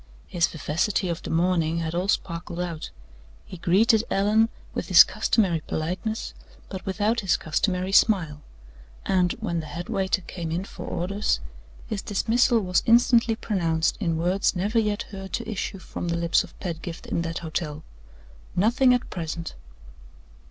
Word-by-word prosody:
His 170 Hz, -2 st, +1 dB
vivacity 170 Hz, +5 st, -1 dB
of 170 Hz, -, -3 dB
the -, -, -7 dB
morning 165 Hz, -1 st, +1 dB
had 165 Hz, -1 st, -2 dB
all 180 Hz, +3 st, -1 dB
sparkled 170 Hz, -3 st, -2 dB
out; 170 Hz, -3 st, -4 dB, 0.6 s
he 185 Hz, -, -9 dB
greeted 210 Hz, +6 st, +3 dB
Allan 215 Hz, +3 st, +3 dB, 0.2 s
with -, -, -3 dB
his -, -, +10 dB
customary 185 Hz, -7 st, +1 dB
politeness, 185 Hz, +8 st, -3 dB, 0.4 s
but 190 Hz, -2 st, -6 dB
without 210 Hz, +4 st, +1 dB
his 195 Hz, -4 st, +2 dB
customary 180 Hz, +4 st, -1 dB
smile; 170 Hz, -8 st, +3 dB, 0.6 s
and, 180 Hz, -2 st, +2 dB
when 200 Hz, -7 st, -3 dB
the 155 Hz, -, -6 dB
headwaiter 190 Hz, +4 st, -1 dB
came 170 Hz, -1 st, -6 dB
in 175 Hz, +3 st, -1 dB
for -, -, -9 dB
orders, 200 Hz, +4 st, -1 dB, 0.5 s
his 215 Hz, -4 st, -4 dB
dismissal 230 Hz, +3 st, +2 dB
was 180 Hz, -2 st, +1 dB
instantly 235 Hz, 0 st, +5 dB
pronounced 170 Hz, -8 st, 0 dB
in 165 Hz, -6 st, 0 dB
words 180 Hz, +4 st, +1 dB
never 205 Hz, +6 st, +1 dB
yet 210 Hz, -1 st, 0 dB
heard 195 Hz, -1 st, -8 dB
to 230 Hz, -, -3 dB
issue 200 Hz, -2 st, -3 dB
from 180 Hz, -1 st, -6 dB
the 170 Hz, 0 st, 0 dB
lips 170 Hz, 0 st, +2 dB
of -, -, -15 dB
Pedgift 170 Hz, -2 st, -6 dB
in -, -, -1 dB
that 165 Hz, 0 st, -3 dB
hotel: 155 Hz, -1 st, -4 dB, 0.7 s
"Nothing 250 Hz, +6 st, +4 dB
at 245 Hz, -, -3 dB
present." 165 Hz, -1 st, -4 dB
185 Hz, 150 wpm, -25 LUFS, 170-210 Hz, 0.7 s, his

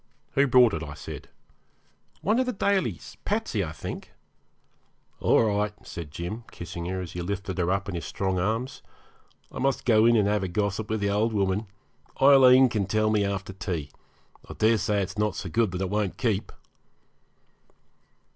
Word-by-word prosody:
'Who 140 Hz, +1 st, +3 dB
brought 125 Hz, -3 st, +6 dB
it?' 80 Hz, -, -2 dB
I 75 Hz, -2 st, -7 dB
said. 75 Hz, -, -9 dB, 0.9 s
'One 215 Hz, +4 st, +2 dB
of 260 Hz, -, +1 dB
the 250 Hz, -, -1 dB
Dalys 200 Hz, -1 st, -1 dB
Patsey, 205 Hz, -, -1 dB
I 80 Hz, -, -5 dB
think.' 80 Hz, -, -7 dB, 1.1 s
'All -, -, +4 dB
right,' 105 Hz, -1 st, 0 dB
said 85 Hz, -3 st, -7 dB
Jim, 85 Hz, +9 st, -6 dB
kissing 85 Hz, 0 st, -7 dB
her 95 Hz, +1 st, -3 dB
as 90 Hz, -, -7 dB
he 90 Hz, -, -5 dB
lifted 95 Hz, +1 st, -4 dB
her 90 Hz, 0 st, +1 dB
up 100 Hz, +1 st, 0 dB
in 100 Hz, -, -4 dB
his 85 Hz, -, -3 dB
great -, -, -6 dB
strong 95 Hz, -2 st, -1 dB
arms. 110 Hz, +7 st, -2 dB, 0.7 s
'I -, -, -7 dB
must 135 Hz, -1 st, 0 dB
go 110 Hz, -1 st, +5 dB
in 120 Hz, -, +5 dB
and 105 Hz, -3 st, +3 dB
have 105 Hz, 0 st, +1 dB
a 95 Hz, -, -2 dB
gossip 100 Hz, +3 st, -2 dB
with 110 Hz, -1 st, -1 dB
the 100 Hz, 0 st, +1 dB
old 110 Hz, +3 st, +1 dB
woman. 100 Hz, +1 st, 0 dB, 0.5 s
Aileen 130 Hz, -1 st, +7 dB
can 105 Hz, -5 st, -1 dB
tell 110 Hz, +2 st, +1 dB
me 105 Hz, -1 st, +2 dB
after 95 Hz, -1 st, -3 dB
tea. 85 Hz, -7 st, -4 dB, 0.6 s
I -, -, -6 dB
daresay 105 Hz, -2 st, +2 dB
it's 95 Hz, +2 st, -6 dB
not 105 Hz, 0 st, +1 dB
so 95 Hz, -, -5 dB
good 115 Hz, +4 st, +2 dB
that 90 Hz, +1 st, -4 dB
it 95 Hz, -, -1 dB
won't 105 Hz, -3 st, -1 dB
keep.' 110 Hz, -6 st, -1 dB
105 Hz, 185 wpm, -26 LUFS, 95-115 Hz, 1.1 s, Aileen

